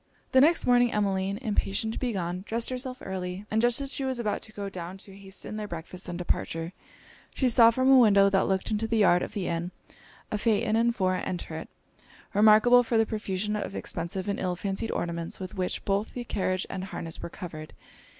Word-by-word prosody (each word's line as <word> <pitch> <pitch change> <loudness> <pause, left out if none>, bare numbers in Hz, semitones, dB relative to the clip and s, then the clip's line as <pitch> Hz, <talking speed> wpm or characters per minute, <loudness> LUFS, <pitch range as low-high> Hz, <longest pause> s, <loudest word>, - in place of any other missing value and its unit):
The 260 - +6
next 325 +4 +4
morning 245 -1 +4
Emmeline, 195 -1 0
impatient 215 0 -1
to - - -4
be 250 -2 -1
gone, 180 -1 -3
dressed 230 +2 -1
herself 255 0 -5
early; 185 +1 -4
and 220 +1 +2
just 240 +1 +2
as 275 0 -1
she 275 - -2
was 260 -1 -1
about 215 -3 -2
to 215 - -9
go 205 -2 -5
down 185 -1 -6
to 195 0 -12
hasten 195 +2 -8
their 210 -1 -4
breakfast 175 +1 -7
and 175 - -4
departure, 170 -1 -2 0.6
she 260 - +2
saw, 230 -1 +7
from 255 +3 +1
a 265 -1 +8
window 200 -4 +6
that 195 -1 +2
looked 190 +2 -1
into 215 +1 0
the 225 0 0
yard 180 -4 +5
of - - -5
the 195 -3 -3
inn, 170 +1 -2 0.6
a 210 - -1
phaeton 220 0 +1
and 235 +1 +2
four 185 -3 +1
enter 175 -3 -4
it, 160 - -7 0.6
remarkable 215 +4 +6
for 235 -1 0
the 225 - +4
profusion 210 -1 -2
of 205 -1 -4
expensive 185 +4 -4
and 200 - -1
ill 180 -1 -1
fancied 195 +4 -3
ornaments 170 -1 -3
with 185 0 -6
which 185 -3 -3
both 200 +2 -1
the 245 - -3
carriage 185 -4 -1
and 190 -1 -5
harness 165 -4 -6
were - - -5
covered. 165 -4 -8
200 Hz, 210 wpm, -27 LUFS, 185-230 Hz, 0.6 s, a